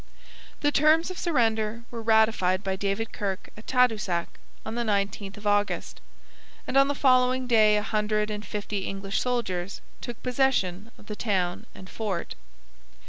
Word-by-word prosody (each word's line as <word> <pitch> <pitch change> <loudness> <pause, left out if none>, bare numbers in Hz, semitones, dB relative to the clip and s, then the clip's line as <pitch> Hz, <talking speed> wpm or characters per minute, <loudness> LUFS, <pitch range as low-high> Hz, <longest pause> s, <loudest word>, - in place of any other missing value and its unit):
The 290 - +3
terms 315 +4 +4
of 365 - -7
surrender 230 -7 0
were 235 -1 -5
ratified 220 -4 +3
by 190 -1 -1
David 200 +3 -2
Kirke 195 -2 -3
at 215 - -14
Tadoussac 220 -9 +2 0.4
on - - -4
the 240 - -1
19th 200 -2 -1
of 210 - -12
August, 205 0 0 0.6
and - - -4
on 275 0 +6
the 285 - -1
following 255 -1 +3
day 215 -3 +5
a 210 - -1
hundred 215 0 0
and 210 0 -4
fifty 205 -2 -4
English 195 0 -2
soldiers 200 -7 -2 0.2
took 240 -2 -7
possession 235 -7 0
of - - -17
the 210 - -6
town 195 -1 -1
and 185 - -11
fort. 195 -5 -4
215 Hz, 155 wpm, -26 LUFS, 200-240 Hz, 0.6 s, on